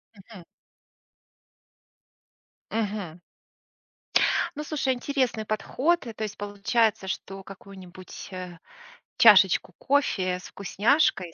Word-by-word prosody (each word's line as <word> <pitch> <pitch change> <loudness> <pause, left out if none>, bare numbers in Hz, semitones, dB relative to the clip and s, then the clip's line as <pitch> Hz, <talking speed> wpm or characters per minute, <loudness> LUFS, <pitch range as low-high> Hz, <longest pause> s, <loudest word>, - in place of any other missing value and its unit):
Мгм. 195 -1 -14 2.3
Мгм. 205 -6 -3 1.4
Ну 300 - -4
слушай, 295 -3 -1
интересный 255 -3 -1
подход. 265 +9 0
Э, 230 - -6
то 220 - -4
есть 210 -1 -6
получается, 205 +1 0
что 195 +1 -5
какую-нибудь, 190 -2 -11
э, 180 -2 -7 0.6
чашечку 195 -4 +6
кофе 190 -10 0
с - - -15
вкусняшкой, 205 - +1
205 Hz, 90 wpm, -26 LUFS, 185-240 Hz, 2.3 s, чашечку